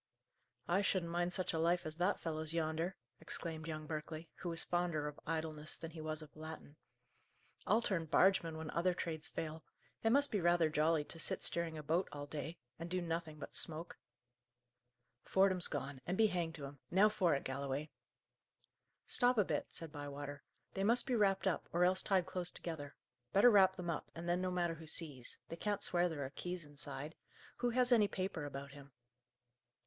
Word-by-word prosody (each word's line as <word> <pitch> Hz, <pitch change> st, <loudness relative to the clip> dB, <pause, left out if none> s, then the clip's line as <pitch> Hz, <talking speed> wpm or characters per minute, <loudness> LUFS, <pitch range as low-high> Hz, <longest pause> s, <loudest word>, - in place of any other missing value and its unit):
"I 185 Hz, +3 st, +3 dB
shouldn't 185 Hz, -4 st, 0 dB
mind 175 Hz, +1 st, 0 dB
such 185 Hz, 0 st, -1 dB
a 160 Hz, -, 0 dB
life 175 Hz, +2 st, +2 dB
as 155 Hz, 0 st, -5 dB
that 185 Hz, +3 st, +1 dB
fellow's 160 Hz, 0 st, -1 dB
yonder!" 165 Hz, +3 st, -1 dB, 0.2 s
exclaimed 160 Hz, -1 st, -4 dB
young 155 Hz, -1 st, -4 dB
Berkeley, 155 Hz, +1 st, -5 dB
who 180 Hz, -, -4 dB
was 165 Hz, -1 st, -3 dB
fonder 175 Hz, -4 st, 0 dB
of 150 Hz, -, -7 dB
idleness 155 Hz, -1 st, -3 dB
than 165 Hz, -, -7 dB
he 160 Hz, -1 st, -8 dB
was 155 Hz, 0 st, -4 dB
of 150 Hz, -, -15 dB
Latin. 155 Hz, -1 st, -9 dB, 0.9 s
"I'll 225 Hz, +2 st, +4 dB
turn 170 Hz, -7 st, 0 dB
bargeman 165 Hz, 0 st, +3 dB
when 160 Hz, -1 st, -5 dB
other 175 Hz, +1 st, +1 dB
trades 160 Hz, -2 st, -3 dB
fail. 160 Hz, -1 st, -5 dB, 0.4 s
It 225 Hz, -, +3 dB
must 280 Hz, +4 st, +5 dB
be 205 Hz, -, +1 dB
rather 170 Hz, -2 st, +4 dB
jolly 155 Hz, 0 st, +3 dB
to 165 Hz, -, -6 dB
sit -, -, 0 dB
steering 170 Hz, -2 st, +1 dB
a 155 Hz, -, -6 dB
boat 165 Hz, +5 st, +1 dB
all 145 Hz, -1 st, -5 dB
day, 155 Hz, +3 st, -5 dB, 0.2 s
and 165 Hz, +1 st, -5 dB
do 185 Hz, +1 st, 0 dB
nothing 165 Hz, -2 st, -3 dB
but -, -, -8 dB
smoke." 165 Hz, +2 st, -4 dB, 1.2 s
"Fordham's 190 Hz, -2 st, +7 dB
gone, 140 Hz, -1 st, -4 dB
and 180 Hz, +2 st, -1 dB
be 225 Hz, -, +6 dB
hanged 175 Hz, -5 st, 0 dB
to 145 Hz, -, -6 dB
him! 140 Hz, 0 st, -10 dB
Now 195 Hz, +4 st, +6 dB
for 190 Hz, -7 st, +2 dB
it, 140 Hz, -, -3 dB
Galloway!" 140 Hz, +2 st, -3 dB, 1.1 s
"Stop 245 Hz, -1 st, +4 dB
a 210 Hz, -, +4 dB
bit," -, -, -1 dB
said 165 Hz, -2 st, -5 dB
Bywater. 145 Hz, -1 st, -6 dB, 0.3 s
"They 195 Hz, -, -1 dB
must 235 Hz, +4 st, +4 dB
be 255 Hz, -, +1 dB
wrapped 195 Hz, -3 st, +3 dB
up, 190 Hz, -, 0 dB
or 175 Hz, +1 st, +3 dB
else 185 Hz, +1 st, +4 dB
tied 190 Hz, -3 st, +2 dB
close 180 Hz, -1 st, -2 dB
together. 155 Hz, -6 st, -6 dB, 0.4 s
Better 240 Hz, +5 st, +7 dB
wrap 190 Hz, -3 st, +6 dB
them 175 Hz, -2 st, -3 dB
up, 160 Hz, -, -4 dB
and 170 Hz, +1 st, -6 dB
then 175 Hz, +1 st, +1 dB
no 185 Hz, -, 0 dB
matter 175 Hz, -2 st, 0 dB
who 165 Hz, -1 st, -10 dB
sees. 145 Hz, -6 st, -1 dB
They 165 Hz, -, -5 dB
can't 205 Hz, +2 st, -1 dB
swear 175 Hz, 0 st, +2 dB
there 145 Hz, -4 st, -3 dB
are 130 Hz, -, -6 dB
keys 180 Hz, +1 st, -5 dB
inside. 145 Hz, 0 st, -4 dB, 0.4 s
Who 245 Hz, -, +1 dB
has 250 Hz, +1 st, +3 dB
any 220 Hz, -4 st, +6 dB
paper 185 Hz, -6 st, -3 dB
about 140 Hz, 0 st, -6 dB
him?" 140 Hz, -1 st, -13 dB
165 Hz, 195 wpm, -37 LUFS, 155-185 Hz, 1.2 s, Fordham's